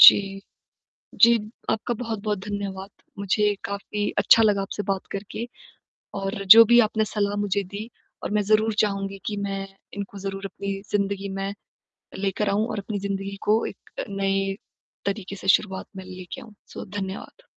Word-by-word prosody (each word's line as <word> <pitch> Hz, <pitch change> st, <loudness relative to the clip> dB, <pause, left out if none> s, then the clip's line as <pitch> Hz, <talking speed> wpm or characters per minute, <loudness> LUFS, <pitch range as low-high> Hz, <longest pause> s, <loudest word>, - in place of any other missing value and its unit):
जी। -, -, +12 dB, 1.1 s
जी, 235 Hz, -, +10 dB, 0.4 s
आपका 230 Hz, +2 st, 0 dB
बहुत-बहुत 215 Hz, -4 st, -2 dB
धन्यवाद 200 Hz, -1 st, -4 dB, 0.3 s
मुझे 205 Hz, +1 st, +2 dB
काफ़ी 205 Hz, +1 st, -2 dB
अच्छा 225 Hz, -, +6 dB
लगा 205 Hz, -2 st, +3 dB
आपसे 195 Hz, +1 st, -4 dB
बात 195 Hz, -1 st, -2 dB
करके। 210 Hz, +4 st, -5 dB, 0.7 s
और 195 Hz, 0 st, -3 dB
जो 230 Hz, -, +11 dB
भी 240 Hz, -, +9 dB
आपने 220 Hz, 0 st, 0 dB
सलाह 205 Hz, -1 st, +1 dB
मुझे 200 Hz, 0 st, 0 dB
दी 215 Hz, +3 st, -5 dB, 0.3 s
और -, -, -3 dB
मैं 210 Hz, -, +3 dB
ज़रूर 215 Hz, +1 st, +4 dB
चाहूँगी 195 Hz, -1 st, -2 dB
कि 210 Hz, -, -2 dB
मैं 195 Hz, 0 st, -3 dB, 0.3 s
इनको 200 Hz, 0 st, -6 dB
ज़रूर 195 Hz, 0 st, -4 dB
अपनी 200 Hz, 0 st, -4 dB, 0.2 s
ज़िंदगी 200 Hz, -1 st, 0 dB
में 195 Hz, +1 st, -2 dB, 0.7 s
लेकर 200 Hz, +1 st, 0 dB
आऊँ 210 Hz, +3 st, +2 dB
और -, -, -3 dB
अपनी 205 Hz, +1 st, -3 dB
ज़िंदगी 195 Hz, 0 st, -3 dB
को 220 Hz, +2 st, +4 dB
एक -, -, -10 dB, 0.2 s
नए 195 Hz, 0 st, 0 dB, 0.5 s
तरीके 200 Hz, -1 st, -3 dB
से 190 Hz, -, -8 dB
शुरुआत 190 Hz, -1 st, +3 dB
में 190 Hz, -, -7 dB
लेके 185 Hz, +6 st, -8 dB
आऊँ। 220 Hz, -3 st, -13 dB
सो -, -, -7 dB
धन्यवाद। 195 Hz, -, -6 dB
200 Hz, 155 wpm, -25 LUFS, 195-210 Hz, 1.1 s, जी